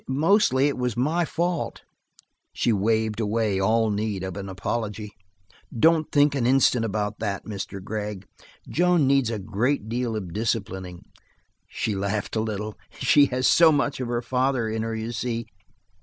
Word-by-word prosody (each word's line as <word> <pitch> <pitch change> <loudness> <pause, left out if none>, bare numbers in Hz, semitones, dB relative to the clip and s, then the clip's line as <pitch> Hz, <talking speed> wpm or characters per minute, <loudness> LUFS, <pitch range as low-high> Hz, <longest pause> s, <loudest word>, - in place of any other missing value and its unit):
Mostly, 145 0 +3
it 140 - -2
was 125 -3 -1
my 160 +7 +1
fault." 170 +1 -2 0.7
She 120 - +1
waved 110 +1 0
away 110 -2 0
all 110 +2 +2
need 105 -2 -2
of 95 -1 -5
apology. 105 +2 -4 0.7
"Don't 160 +5 +3
think 145 -1 +4
an 130 -4 0
instant 130 -2 +3
about 105 -1 -2
that, 100 -3 -3
Mr. 100 -2 -6
Gregg. 105 -1 -5 0.4
Joan 175 -3 +2
needs 135 -3 +3
a 115 - -2
great 110 +4 -1
deal 120 -1 -2
of 95 -6 -5
disciplining." 95 -5 -3 0.6
She 110 - -2
laughed 100 +2 -2
a - - +1
little. 110 -1 -4 0.2
"She 140 +2 +5
has 130 0 -1
so 165 -1 +6
much 145 -2 0
of 125 - -3
her 120 0 -2
father 130 -2 0
in 110 0 -2
her, 115 0 -3
you 110 +1 -4
see. 115 -1 -3
115 Hz, 155 wpm, -25 LUFS, 105-130 Hz, 0.7 s, so